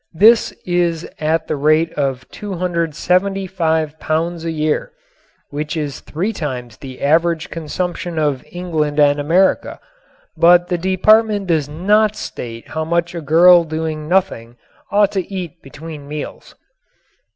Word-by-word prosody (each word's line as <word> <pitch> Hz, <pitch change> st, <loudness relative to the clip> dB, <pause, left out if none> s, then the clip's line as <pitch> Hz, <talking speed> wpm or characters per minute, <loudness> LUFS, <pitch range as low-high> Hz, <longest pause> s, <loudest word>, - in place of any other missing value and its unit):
This 220 Hz, +6 st, +5 dB
is 175 Hz, -2 st, 0 dB
at 160 Hz, +1 st, 0 dB
the -, -, -2 dB
rate 155 Hz, +3 st, +2 dB
of 135 Hz, -3 st, -2 dB
275 180 Hz, -2 st, -1 dB
pounds 165 Hz, +1 st, -2 dB
a 165 Hz, -, -2 dB
year, 155 Hz, -1 st, -1 dB, 0.6 s
which 150 Hz, +2 st, -4 dB
is 145 Hz, -3 st, -3 dB
three 190 Hz, +9 st, -3 dB
times 125 Hz, -, -5 dB
the 130 Hz, -2 st, -10 dB
average 165 Hz, +2 st, +1 dB
consumption 170 Hz, +1 st, -4 dB
of 145 Hz, -4 st, 0 dB
England 160 Hz, -4 st, -2 dB
and 145 Hz, 0 st, +4 dB
America. 170 Hz, +6 st, +1 dB, 0.6 s
But 175 Hz, +1 st, +5 dB
the 175 Hz, -2 st, -1 dB
Department 205 Hz, +3 st, +3 dB
does 160 Hz, -5 st, 0 dB
not 210 Hz, +7 st, +2 dB
state 115 Hz, -, -7 dB
how 160 Hz, 0 st, -3 dB
much 170 Hz, +1 st, -1 dB
a 170 Hz, -, -5 dB
girl 170 Hz, +3 st, +6 dB
doing 155 Hz, -1 st, -4 dB
nothing 155 Hz, -11 st, 0 dB, 0.4 s
ought 205 Hz, -1 st, +3 dB
to 195 Hz, 0 st, -3 dB
eat 180 Hz, -3 st, -6 dB
between 145 Hz, +1 st, -10 dB
meals. 150 Hz, 0 st, -7 dB
165 Hz, 130 wpm, -18 LUFS, 150-180 Hz, 0.6 s, girl